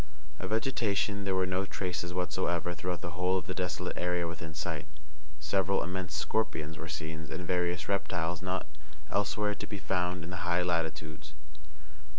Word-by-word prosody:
Of 95 - -3
vegetation 105 -3 +2
there 95 -1 +2
were 95 0 +4
no 95 +1 +1
traces 90 -3 -2
whatsoever 90 0 +1
throughout 90 +1 -2
the 85 -3 -3
whole 90 +2 +3
of 95 - -2
the 95 - -2
desolate 90 -1 -1
area 90 -1 +2
within 80 -1 -5
sight. 75 - -2 0.5
Several 95 +5 +3
immense 90 -3 -2
scorpions 80 -3 0
were 80 - -6
seen, 80 +1 -3
and 90 - -3
various 90 -1 +1
reptiles 90 -4 +1
not 95 0 0 0.5
elsewhere 105 +1 +2
to - - -6
be 105 - -3
found 90 -2 0
in 85 - -5
the 90 - -2
high 90 +1 +2
latitudes. 80 -3 -1
90 Hz, 165 wpm, -32 LUFS, 85-95 Hz, 0.5 s, were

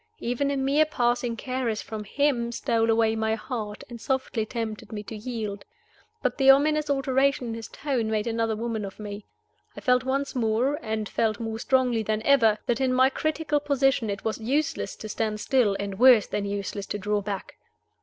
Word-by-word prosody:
Even 250 +4 -1
a 280 - -1
mere 275 +3 +3
passing 240 -4 0
caress 255 -3 -2
from 215 -1 -6
him 245 -1 0
stole 230 -1 0
away 225 0 +3
my 220 0 0
heart, 215 -1 -5
and 235 -2 -10
softly 255 -4 -1
tempted 220 -3 -5
me 210 -1 -5
to 220 - -8
yield. 215 -3 -5 0.6
But - - -1
the 270 0 +5
ominous 300 +2 +5
alteration 270 -2 +1
in - - -3
his 225 -2 -6
tone 255 -6 -2
made 215 -1 0
another 225 -1 0
woman 225 -1 -3
of 195 +1 -8
me. 205 -1 -7 0.5
I - - -4
felt 250 -1 +2
once 275 +2 -1
more, 245 +4 +1
and 220 -3 -3
felt 215 -1 0
more 225 -1 -4
strongly 250 -3 +2
than 215 0 -1
ever, 225 -6 +4
that 240 +1 0
in 260 -1 +2
my 260 +1 +4
critical 310 0 0
position 270 -5 +1
it 200 0 -4
was 220 0 -1
useless 290 +8 -1
to 215 - -8
stand 215 0 -2
still, 220 -5 +2
and 200 -1 -4
worse 250 -4 +7
than 205 - -3
useless 200 0 -4
to - - -3
draw 205 +1 -1
back. 200 -1 -6
230 Hz, 190 wpm, -26 LUFS, 215-265 Hz, 0.6 s, worse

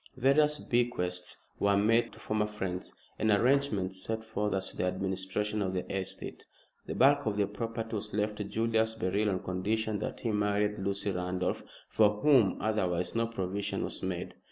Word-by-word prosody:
Various 150 +4 +4
bequests 90 -10 -1 0.2
were 100 0 +3
made 115 +4 +3
to - - -14
former 110 -1 0
friends, 95 -4 -4 0.2
and 110 - +2
arrangements 105 -5 +2
set 110 0 -3
forth 105 -2 -1
as 95 0 -2
to - - -12
the - - 0
administration 95 +3 -1
of 95 -1 -1
the 90 - -2
estate. 95 -1 -5 0.4
The - - -3
bulk 140 +1 +5
of 105 -1 0
the 100 - +3
property 115 +2 -4
was 105 +1 -6
left 105 0 -1
to 105 - -2
Julius 110 +1 +1
Beryl 105 0 +1
on 95 -2 -1
condition 105 +3 -1
that - - -4
he 115 - 0
married 105 0 +1
Lucy 100 +1 -1
Randolph, 90 0 -1 0.3
for 105 -1 +3
whom 130 -10 +5
otherwise 95 -5 0
no 115 0 +1
provision 100 -2 -2
was - - -3
made. 90 -2 -3
105 Hz, 175 wpm, -31 LUFS, 95-110 Hz, 0.4 s, bulk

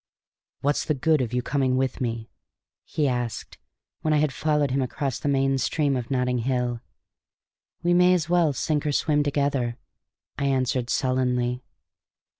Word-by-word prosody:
"What's 145 +1 +1
the 155 - 0
good 155 +2 +2
of 120 -3 -2
your 125 0 -1
coming 130 -2 +1
with 130 +1 -1
me?" 115 -2 -3 0.5
he 150 -3 0
asked, 120 -3 -3 0.4
when 155 -1 +2
I - - +4
had 150 -2 +1
followed 150 0 +1
him 135 +1 +1
across 130 0 -2
the 145 - -1
main 135 -1 +2
stream 140 +2 +1
of 125 -2 -4
Notting 125 -2 0
Hill. 125 -1 -1 1.0
"We 175 0 +3
may 180 +1 +5
as 160 -3 -1
well 175 -3 +3
sink 150 +2 -1
or 145 - 0
swim 150 0 +2
together," 140 -4 0 0.6
I 140 - 0
answered 130 -2 0
sullenly. 125 -1 0
135 Hz, 160 wpm, -25 LUFS, 125-150 Hz, 1.0 s, may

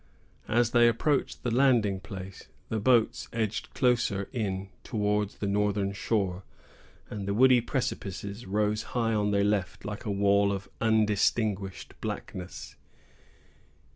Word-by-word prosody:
As 115 0 +2
they 120 -1 +6
approached 135 +5 0
the 120 - -1
landing 120 -7 +3
place, 95 0 -9 0.2
the 110 - -1
boats 115 +1 +2
edged 110 -2 -2
closer 120 -6 +1
in 100 -5 -2
towards 105 -2 -1
the - - -4
northern 100 0 +1
shore, 100 -3 -1 0.7
and 100 -2 -5
the 100 - 0
woody 125 +1 +6
precipices 100 -4 -4
rose 105 +2 +1 0.2
high 115 -1 +1
on 105 -1 +1
their 100 -1 +2
left, 100 -2 -1
like 105 0 -5
a 110 - -4
wall 100 0 +3
of 100 0 -4
undistinguished 105 -2 +1
blackness. 90 -1 -6
105 Hz, 130 wpm, -28 LUFS, 100-115 Hz, 0.7 s, they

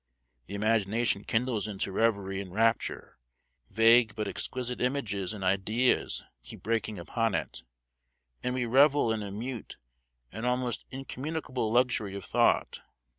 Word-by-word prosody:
The 100 - -6
imagination 110 0 +1
kindles 110 -3 0
into 100 -1 -3
reverie 100 -2 0
and 95 -2 -9
rapture, 115 +3 0 0.5
vague 115 0 +5
but 105 -2 -2
exquisite 125 +4 -3
images 110 -8 -1
and 105 -3 -6
ideas 100 +7 +1 0.2
keep - - -11
breaking 110 -1 -1
upon 110 +4 -1
it, 85 - -3 0.8
and 125 0 -2
we 125 -1 0
revel 135 0 +4
in 110 - -3
a 100 - -5
mute 115 +4 -6 0.5
and 110 +3 -7
almost 125 -1 -1
incommunicable 135 -2 -4
luxury 120 -5 +1
of 100 - -6
thought. - - +2
115 Hz, 130 wpm, -29 LUFS, 100-125 Hz, 0.8 s, vague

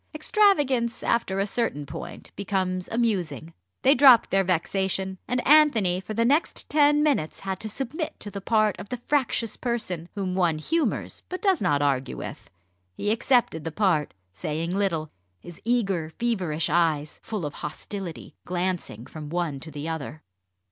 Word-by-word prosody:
Extravagance 290 - +2
after 195 -5 +1
a 195 - +2
certain 200 -9 -1
point - - -8
becomes 185 -2 -2
amusing. 180 - -1 0.3
They 270 - +7
dropped 255 -4 +7
their 195 0 +3
vexation, 190 +1 -1
and 250 0 -1
Anthony 235 -12 +5
for 215 +2 -6
the 230 +1 +2
next 290 +7 +1
ten 295 0 +4
minutes 270 - 0
had 190 -1 -3
to 215 - -5
submit 275 - -4
to 205 - -5
the 200 0 -6
part 215 0 +2
of 200 - -8
the 250 - -3
fractious 245 -3 0
person 200 -9 -2
whom 190 -3 -2
one 175 -4 +2
humours 320 - -1
but 365 - -4
does 385 -6 +2
not 145 -6 +2
argue 135 -2 0
with. - - -8 0.5
He 205 - 0
accepted 235 - +2
the 165 - -4
part, 170 -5 +1 0.2
saying 165 - -3
little, 170 -6 -1 0.3
his 175 -1 -12
eager, 195 -9 +1
feverish 180 -7 -1
eyes, 155 -3 +1
full 210 -7 -4
of 145 - -4
hostility, 170 +3 -6
glancing 180 - -3
from 150 0 -8
one 165 -4 -2
to 160 - -9
the 145 +1 -6
other. 155 -1 -5
195 Hz, 160 wpm, -26 LUFS, 165-235 Hz, 0.5 s, They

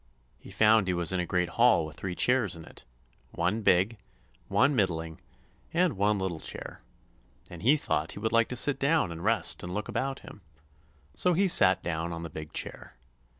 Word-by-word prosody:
He - - -14
found 110 -2 +3
he 90 - 0
was 85 +1 0
in 95 - 0
a 90 - -2
great 90 0 0
hall 115 -4 +3
with 80 - -10
three 90 -2 -5
chairs 120 -7 +1
in 80 -1 -11
it—one 75 - -6
big, 100 +3 +2 0.5
one 140 +2 +2
middling, 80 -6 -2 0.5
and 175 -3 +2
one 100 +2 +1
little 95 -4 -3
chair; - - -8 0.7
and 85 -2 -9
he 135 +8 +4
thought 80 - -2
he - - -8
would 110 +1 -2
like 115 0 +3
to 125 - -5
sit 135 +2 +4
down 140 - +1
and 85 0 -8
rest 110 +2 +1
and 90 - -7
look 105 - -3
about 135 0 -3
him; 105 - -13 0.7
so 180 - +1
he 195 +4 +2
sat 95 - +4
down 85 0 -3
on 85 0 -6
the 85 - -7
big 75 -1 -8
chair. - - -6
95 Hz, 195 wpm, -28 LUFS, 85-120 Hz, 0.7 s, he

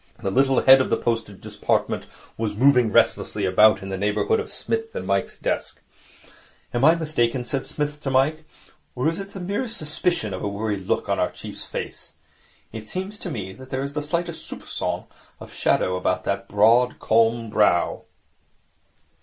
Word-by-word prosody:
The 100 -4 -2
little 135 +3 +3
head 130 0 +8
of - - -1
the - - +2
Postage 115 -4 -2
Department - - -1 0.3
was 110 -2 -3
moving 125 -1 +4
restlessly - - +2
about 105 +3 +5
in 95 - -6
the 95 -1 -4
neighbourhood 105 +1 +1
of - - -5
Psmith's 225 0 -3
and 95 - -4
Mike's 100 +1 -1
desk. - - -3 0.9
'Am 120 +1 0
I 160 +3 +7
mistaken,' 130 -7 0
said 135 +1 -2
Psmith 150 0 -3
to 135 - -2
Mike, 140 +4 +2 0.5
'or 125 +4 0
is 165 - -3
there 195 - -5
the 195 0 -9
merest 205 +6 -3
suspicion 155 - -1
of 95 - -5
a - - 0
worried 100 -1 -3
look - - 0
on - - 0
our - - +2
chief's - - -8
face? - - -7 0.6
It 110 -1 -8
seems 190 - -4
to 180 - -5
me 100 - -5
that 130 +5 -13
there 130 +1 -2
is 140 +1 -5
the 150 - -2
slightest 170 +3 -3
soupcon - - -4 0.3
of - - -11
shadow 90 - +1
about 90 0 -1
that 100 0 -2
broad, 115 +5 +4
calm 115 0 +2
brow.' 105 -5 +2
120 Hz, 180 wpm, -23 LUFS, 105-150 Hz, 0.9 s, head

